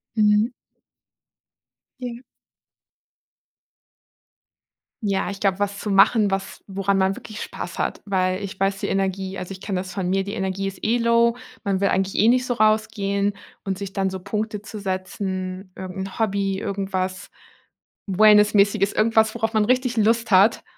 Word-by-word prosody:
Mhm. 210 +1 +3 1.5
Ja. 245 -2 -6 2.8
Ja, 195 -3 0
ich 200 0 -6
glaube, 195 -1 +1
was 205 0 -1
zu 210 - -4
machen, 200 +1 +5
was 195 0 -4
woran 195 0 0
man 190 0 +2
wirklich 215 0 -9
Spaß - - -6
hat. - - -2
Weil 185 -2 0
ich 190 -1 -7
weiß 195 0 +1
die - - -2
Energie, 195 0 -1
also, 180 +1 -6
ich 190 -1 -8
kenne 195 -3 -2
das 185 0 -8
von 185 -3 -2
mir 195 +1 +1
die 200 +1 -6
Energie 190 0 -2
ist 195 -1 -6
eh 230 +3 +2
low, 235 0 +3 0.3
man 195 -3 0
will 200 - +3
eigentlich 190 +1 0
eh 215 - +4
nicht 250 +1 +4
so 250 - 0
rausgehen 215 -2 +1 0.3
und 190 -1 -3
sich 200 -1 -6
dann 195 -1 0
so 190 0 -5
Punkte 210 +2 -3
zu 215 0 -8
setzen, 185 -1 -4
irgendein 190 +1 -6
Hobby, 200 -3 0
irgendwas 190 -2 -3 0.8
wellness-mäßiges, 205 0 +4
irgendwas, 220 0 +3
worauf 225 0 -1
man 215 -1 +3
richtig 255 +1 +1
Lust 225 +1 +2
hat 200 +4 +5
200 Hz, 155 wpm, -23 LUFS, 190-215 Hz, 2.8 s, machen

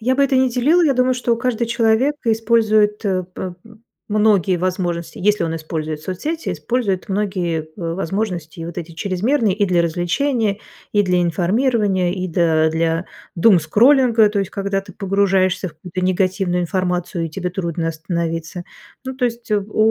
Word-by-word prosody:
Я 255 +4 +1
бы 280 - +3
это 270 -1 +1
не 260 0 +4
делила. 280 +9 +3
Я 280 -4 +3
думаю, 255 0 +2
что 240 -2 0
каждый 240 -1 -1
человек 235 +4 +2
использует, 220 -2 +2
э, 185 -3 0
п 185 -1 -5 0.6
многие 205 -4 +3
возможности 175 -2 -2
если 210 +3 +2
он 165 -1 -2
использует 155 -1 -4
соцсети, 295 - -4
использует 225 -7 -2
многие 180 -6 -1
в 170 -3 -3
возможности 180 -4 -3
и - - -4
вот 170 +1 -6
эти 170 -1 -7
чрезмерные: 200 - 0
и 205 0 +1
для 175 -2 +2
развлечения, 200 - 0 0.3
и 205 - +4
для 180 -2 +1
информирования, 190 - +1
и, 185 -1 -3
да, 160 -2 +2
для 165 +1 0 0.3
думскроллинга. 225 - +5
То 205 - -1
есть 195 -1 -3
когда 195 -1 -2
ты - - -13
погружаешься 195 -2 +1
в - - -14
какую-то 180 +3 -6
негативную 185 -1 0
информацию 180 -1 -2
и - - -9
тебе 180 +3 -4
трудно 170 -2 -3
остановиться. 165 +1 -4 0.4
Ну, 260 0 -5
то 255 - 0
есть, 235 -1 -6
э, 210 - +3
в 205 +2 -11
190 Hz, 165 wpm, -19 LUFS, 175-225 Hz, 0.6 s, думскроллинга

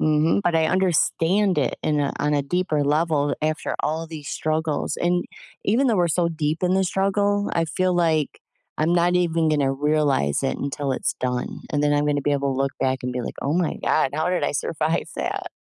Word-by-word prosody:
Mhm. 155 +5 +2
But 175 -3 +2
I 160 - +3
understand 185 +2 +2
it 145 - 0
in 150 -1 +1
a 140 - 0
on 150 0 +1
a 145 - +1
deeper 155 0 0
level 150 0 +1
after 155 +1 -2
all 160 +1 -2
these 150 -4 -8
struggles. 155 -1 -1
And, 175 0 +1 0.4
even 240 +7 +2
though 230 - +3
we're 175 -1 +2
so 170 +1 +1
deep 160 0 -2
in 180 +1 +2
the 190 - +3
struggle, 200 +2 +1
I 165 - +2
feel 180 +4 0
like 160 -4 +1 0.4
I'm 155 +3 +1
not 175 0 +3
even 170 -2 +2
gonna 140 -3 +2
realize 145 - +1
it 135 - -1
until 140 0 -3
it's - - -1
done. 125 -1 -2
And 145 - 0
then 145 - +2
I'm 145 0 +1
gonna 145 -1 0
be 145 - +1
able 140 -1 0
to 130 - -3
look 135 0 0
back 130 -1 0
and 125 - -2
be 125 - -2
like, - - -6
"Oh 140 - -1
my 175 -2 0
god. 135 - +2
How 155 +3 0
did 180 - 0
I - - +1
survive 155 +2 -1
that?” - - -3
155 Hz, 215 wpm, -23 LUFS, 145-175 Hz, 0.4 s, I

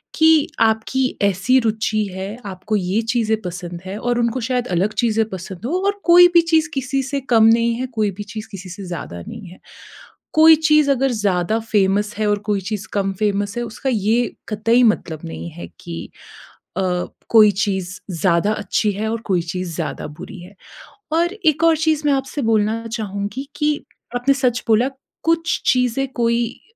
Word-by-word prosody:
कि 320 -2 +5 0.2
आपकी 225 +4 0
ऐसी 200 +6 +3
रूचि 215 -1 0
है, 195 +4 -5
आपको 195 +2 -4
ये 195 +2 0
चीज़ें 220 -2 0
पसंद 175 -1 -6
हैं 195 +2 -5
और 245 +1 -1
उनको 235 +1 0
शायद 250 -1 -1
अलग 195 +5 +1
चीज़ें 225 -2 +2
पसंद 190 +1 -7
हों, 350 +9 -1
और 405 0 0
कोई 355 +1 +8
भी 340 - +7
चीज़ 330 0 +2
किसी 270 0 -1
से 275 +2 -2
कम 220 -1 +6
नहीं 230 +1 +4
है, 255 +2 -3
कोई 210 -2 +1
भी 205 - -3
चीज़ 215 +1 -8
किसी 190 -2 -8
से 195 +3 -8
ज़्यादा 165 - -6
नहीं 215 -5 -8
है। 180 - -13 0.7
कोई 320 +1 +8
चीज़ 305 -2 +5
अगर 270 -1 +1
ज़्यादा 205 -1 0
फ़ेमस 205 -2 +1
है 215 -1 0
और 205 0 +1
कोई 200 -2 +1
चीज़ 205 +1 -5
कम 195 -1 0
फ़ेमस 205 0 -1
है, 240 - -1
उसका 235 +3 -4
ये 225 +3 +1
कतई 230 +3 +2
मतलब 160 -7 -8
नहीं 80 +1 -6
है 85 - -9
कि 85 -1 -7 0.7
अ, - - +1 0.5
कोई 215 -2 +7
चीज़ 190 -2 -3
ज़्यादा 170 +3 +1
अच्छी 210 0 0
है 215 +3 -3
और 230 - -2
कोई 185 -4 +1
चीज़ 175 0 -5
ज़्यादा 165 -3 -4
बुरी - - -9
है। 185 +3 -13 0.6
और 345 +3 +2
एक 325 -6 +1
और 325 -1 +4
चीज़ 315 -1 +1
मैं 285 - +4
आपसे 270 +1 -2
बोलना 220 +1 +1
चाहूँगी 215 +3 -4
कि 300 0 +1 0.4
आपने 250 +3 +3
सच 250 -3 0
बोला, 230 +4 +3 0.3
कुछ 330 0 +1
चीज़ें, 250 +1 +1
कोई 235 0 0
220 Hz, 180 wpm, -20 LUFS, 195-255 Hz, 0.7 s, कोई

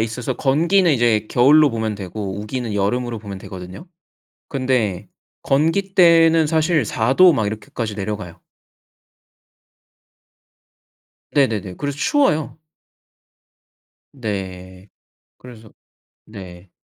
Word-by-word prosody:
있어서 115 +3 -3
건기는 170 +8 +2
이제 115 -4 +1
겨울로 145 +4 +5
보면 110 -2 -3
되고 100 0 -6
우기는 110 0 -5
여름으로 115 +4 -1
보면 100 -2 -8
되거든요. 95 - -10 1.0
근데 95 +1 -9 0.3
건기 165 +8 0
때는 165 -3 +5
사실 160 -3 +1
4 110 +5 -1
도 185 +1 +7
막 110 -6 -1
이렇게까지 110 +1 -5
내려가요. 100 -4 -6 2.9
네네네. 110 -10 0
그래서 145 -1 -4
추워요. 160 - 0 1.5
네. 95 -5 -7 0.5
그래서 115 -4 -14 0.5
네. 95 -3 -12
115 Hz, 215 characters per minute, -20 LUFS, 100-150 Hz, 2.9 s, 도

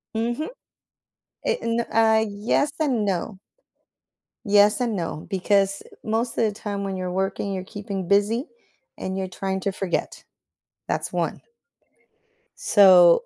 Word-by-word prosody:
Mhm. 240 - -1 1.0
It - - +1
n 230 0 0
uh, 220 -1 +3
yes 215 +8 0
and 255 -9 +1
no. 195 +1 -2 1.1
Yes 205 +2 +5
and 235 -4 0
no, 165 -3 -4
because 195 +1 +1 0.2
most 225 +2 -1
of - - +3
the 215 - +1
time 205 -1 -5
when 195 -1 -3
you're 185 -1 -3
working, 195 +1 -2
you're 185 -1 -3
keeping 200 -2 -6
busy, 210 - +2 0.5
and 190 0 -4
you're 190 -1 -2
trying 190 +1 -3
to 200 - -1
forget, 190 -1 -3 0.6
that's - - -2
one. - - -2 1.1
So 180 -4 +6
200 Hz, 130 wpm, -24 LUFS, 190-225 Hz, 1.1 s, So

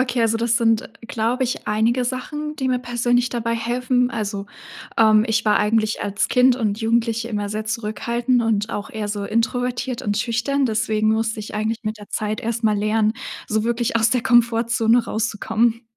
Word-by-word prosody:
okay, 250 -2 0
also, 225 0 +2
das 235 0 +1
sind, 225 -1 +2 0.2
glaube 235 +4 0
ich, 250 - -4
einige 225 +4 +1
Sachen, 295 +4 -4
die 265 -2 -1
mir 255 - +1
persönlich 245 0 +1
dabei 230 -1 -2
helfen. 250 +2 0
Also, 205 -3 -4 0.5
ähm, 215 -1 +5
ich 220 0 +1
war 210 - +3
eigentlich 215 +1 +1
als 200 0 -1
Kind 250 0 +4
und 215 -3 -1
Jugendliche 230 0 0
immer 205 -2 -2
sehr 215 +1 -3
zurückhaltend 235 +3 -1
und 215 -1 0
auch 205 - -5
eher 215 -1 -4
so 205 -1 -3
introvertiert 245 +3 -1
und 205 0 -1
schüchtern, 255 +5 0
deswegen 220 -1 +1
musste 225 0 -1
ich 210 - -8
eigentlich 220 +2 -2
mit 215 0 -3
der 205 - -12
Zeit 215 +3 -2
erst 230 -1 -3
mal 215 -1 +3
lernen, 215 +1 +1 0.3
so 215 0 0
wirklich 235 0 0
aus 225 0 +3
der 250 -2 +1
Komfortzone 230 0 +3
rauszukommen. 225 +1 0
225 Hz, 180 wpm, -21 LUFS, 215-240 Hz, 0.5 s, ähm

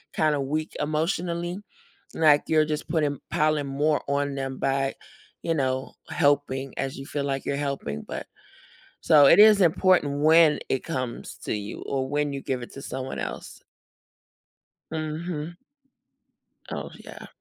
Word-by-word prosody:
kinda 150 -2 +2
weak 155 +3 -2
emotionally, 170 +3 -1 0.6
like, 150 -2 +5
you're 155 -1 +4
just 150 -1 -3
putting 150 -4 0
piling 155 -3 +1
more 145 +2 +1
on 140 0 0
them 135 -1 -4
by, 135 0 0 0.5
you 165 - 0
know, 130 -3 -1 0.2
helping, 140 -3 +1
as 135 - -3
you 135 - -7
feel 145 0 -3
like 135 -1 -2
you're 140 - -1
helping, 140 - -3
but - - -6 0.8
so, 150 -2 +6
it - - +7
is 210 -1 +8
important 165 -4 +3
when 160 -1 +6
it 135 - 0
comes 130 -7 -5
to - - -1
you, 105 0 -6
or 130 -1 -2
when 145 0 0
you 135 - -4
give 130 -2 -3
it 120 - -9
to 135 - -9
someone 130 0 -5
else. - - -6 1.3
Mhm. 160 +1 -4 1.1
Oh, - - -5
yeah. - - -10
145 Hz, 145 wpm, -25 LUFS, 135-155 Hz, 1.3 s, is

